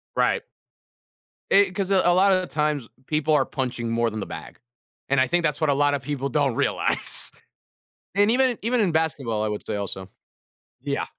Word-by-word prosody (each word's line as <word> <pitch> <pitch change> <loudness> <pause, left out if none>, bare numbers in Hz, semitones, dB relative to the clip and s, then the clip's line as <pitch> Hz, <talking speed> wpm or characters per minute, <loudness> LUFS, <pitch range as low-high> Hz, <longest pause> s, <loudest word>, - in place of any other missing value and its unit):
Right. - - +2 1.1
Eh 200 -1 +5
'cause 195 0 -3
a 195 - +5
a 175 - +5
lot 195 +2 +4
of 185 - +3
the 180 - -6
times, 150 -5 -1 0.2
people 155 0 0
are 140 -3 +4
punching 125 -4 -3
more 115 0 +1
than 110 0 -5
the - - -4
bag, - - -9 0.5
and 140 -1 +3
I 130 - +3
think 175 +5 +1
that's 150 -1 0
what 155 - +2
a 140 - +4
lotta 145 0 +2
people 140 -2 -3
don't 140 -3 +1
realize, - - 0 0.8
and 205 +2 +4
even 260 +2 +4
in 240 - -5
even 240 +1 +1
in 195 - +2
basketball, 135 -9 0
I 110 - 0
would 105 - -4
say - - -2
also. 95 -2 -5 0.7
Yeah. - - -2
150 Hz, 200 wpm, -24 LUFS, 125-185 Hz, 1.1 s, Eh